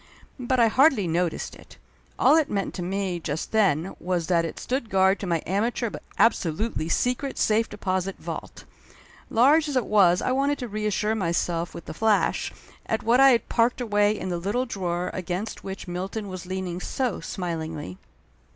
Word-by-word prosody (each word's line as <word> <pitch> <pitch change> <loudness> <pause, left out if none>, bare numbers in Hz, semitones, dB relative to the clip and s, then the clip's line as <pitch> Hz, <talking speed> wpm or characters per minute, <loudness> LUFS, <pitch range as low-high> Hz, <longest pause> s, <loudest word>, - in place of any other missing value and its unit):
But 255 0 0
I 230 - +6
hardly 255 - +4
noticed 170 +1 -1
it. - - -16 0.4
All - - +5
it 320 -2 +2
meant 200 -2 -2
to 180 - -5
me 185 0 -2
just 155 -1 -4
then 190 -6 +2
was 175 -2 -1
that 170 -1 +2
it 165 - -6
stood 250 -3 -2
guard 190 0 +3
to 195 - -4
my 170 -2 0
amateur 225 +4 -1
but - - -7 0.2
absolutely 185 -4 +1
secret 250 +8 0
safe 225 +1 +2
deposit 190 -2 -2
vault. - - -7 0.6
Large 295 +7 +4
as 285 - -3
it 250 -4 +2
was 185 -4 +4
I - - -1
wanted 280 +2 +1
to 250 - -5
reassure 210 0 -1
myself 170 -3 -1
with 170 - -9
a - - -5
flash 215 +4 +1 0.4
at 220 - -1
what 235 +3 +4
I 270 0 +8
had 235 -4 +2
parked 235 +1 +2
away 210 -3 +2
in 185 - -4
the 175 -1 -2
little 205 +8 -1
drawer 180 -6 -3
against 185 +4 -4
which 195 0 -7
Milton 195 +4 -4
was 185 -1 -7
leaning 185 -1 -3
so 245 +3 -2
smilingly. 160 - -5
195 Hz, 180 wpm, -25 LUFS, 175-230 Hz, 0.6 s, I